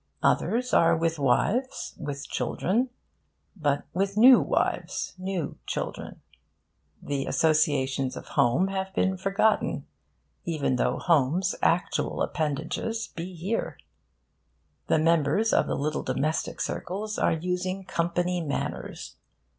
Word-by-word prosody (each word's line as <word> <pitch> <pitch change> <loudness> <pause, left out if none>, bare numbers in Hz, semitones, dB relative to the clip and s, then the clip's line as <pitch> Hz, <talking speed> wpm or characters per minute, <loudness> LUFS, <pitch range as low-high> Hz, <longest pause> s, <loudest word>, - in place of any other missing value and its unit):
Others 250 +2 +1
are 165 - +5
with 165 -1 0
wives, 200 - +1
with 140 -1 -6
children 235 +8 0 0.7
but 145 -6 0
with 195 +2 -1
new 250 +3 +9
wives, - - -1
new 185 -3 -3
children. - - -5 0.8
The 140 -1 -2
associations 140 -4 +1
of - - -9
home 145 +11 +2
have 190 0 -3
been 190 0 +2
forgotten, 195 +3 +1 0.6
even 150 -6 0
though 125 0 +1
home's 170 +3 +2
actual 170 +2 +1
appendages 160 +9 -2
be 175 +2 -6
here. 190 +7 -2 1.1
The - - +3
members 165 +6 +2
of - - +3
the - - -1
little 150 +2 -1
domestic 155 +4 -2
circles 210 +4 -3
are - - +3
using 180 +3 -2
company 175 0 -1
manners. 145 -4 -4
170 Hz, 115 wpm, -27 LUFS, 150-195 Hz, 1.1 s, new